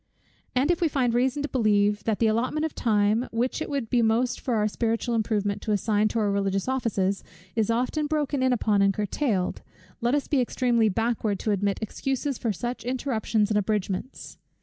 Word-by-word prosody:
And 270 +6 +3
if 345 - -1
we 335 - +4
find 260 -5 +1
reason 260 +4 +1
to - - -1
believe, 210 -4 +2
that 220 -2 +1
the 230 - +2
allotment 245 +8 +1
of 320 - -4
time, 215 +2 +1
which 245 +6 -1
it - - -3
would 280 -5 -2
be 245 - +3
most 230 +2 +1
for 245 - -1
our 210 -1 +2
spiritual 230 +2 -1
improvement 210 -3 0
to 215 - -1
assign 210 +1 +2
to 225 - -3
our 210 -2 +1
religious 195 0 0
offices, 210 -7 0 0.3
is 220 -2 +1
often 255 +6 0
broken 295 -3 -1
in 260 0 +3
upon 215 -4 +2
and 195 -1 +3
curtailed; 210 -2 -1 0.4
let 240 +4 +2
us 290 - -1
be 280 -3 +2
extremely 240 -2 +2
backward 225 0 0
to 215 - 0
admit 200 0 0
excuses 270 +4 -2
for 230 - 0
such 240 +5 -4
interruptions 225 -4 0
and 210 - +3
abridgments. 205 +3 -3
230 Hz, 195 wpm, -26 LUFS, 210-255 Hz, 0.4 s, we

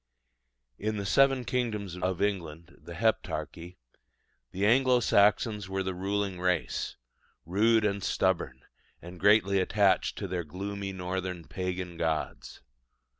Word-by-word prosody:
In 110 +1 -2
the 100 - -3
seven 135 +3 +3
kingdoms 105 -8 -2
of 90 +1 -1
England 85 -4 -3
the 85 - -10
Heptarchy 90 -4 -2 0.7
the 95 +2 -1
Anglo 125 +2 +4
Saxons 105 -2 +2
were 95 0 -1
the 95 0 -3
ruling 100 0 -2
race, 90 -2 -1 0.5
rude 110 +5 +3
and 100 -1 -1
stubborn, 80 -12 0 0.4
and 90 +1 -11
greatly 100 0 +4
attached 100 +1 +2
to 100 - -4
their 90 -1 -3
gloomy 100 +5 -5
northern 90 -1 -4
pagan 90 -2 -4
gods. 80 -1 -3
95 Hz, 125 wpm, -29 LUFS, 90-105 Hz, 0.7 s, Anglo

